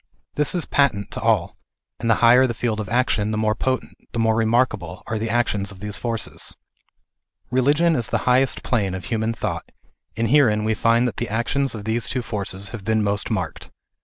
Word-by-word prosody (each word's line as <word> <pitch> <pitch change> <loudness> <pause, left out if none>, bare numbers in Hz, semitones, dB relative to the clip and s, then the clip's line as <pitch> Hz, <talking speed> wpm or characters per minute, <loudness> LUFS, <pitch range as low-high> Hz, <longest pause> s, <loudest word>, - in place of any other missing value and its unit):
This 150 +4 0
is 175 - 0
patent 115 -9 +1
to - - -5
all, - - +1 0.4
and 115 - -2
the 115 - +5
higher 125 +3 +7
the 120 - -3
field 110 -1 -1
of 105 - -4
action 115 -3 +1
the 110 - -1
more 110 0 +2
potent, 130 +3 -2 0.2
the - - -4
more 110 -1 +3
remarkable, 110 -5 0
are 110 -2 -3
the 110 +1 -2
actions 105 -4 0
of 100 - -13
these 105 +1 -4
forces. 115 -3 -3 0.9
Religion 145 +6 +3
is 120 -3 -1
the - - +1
highest 125 +1 +2
plane 100 -7 0
of 95 - -7
human 110 -1 -1
thought, 115 - -4 0.5
and 115 0 0
herein 115 -8 +4
we 110 +1 +1
find 115 +3 +3
that 110 - -5
the - - -3
actions 120 +5 0
of 105 -2 -7
these 110 +1 -1
two 125 0 -2
forces 100 -3 -4
have 105 -1 -8
been 110 +1 +1
most 100 -1 0
marked. 90 -8 -3
115 Hz, 200 wpm, -22 LUFS, 105-125 Hz, 0.9 s, higher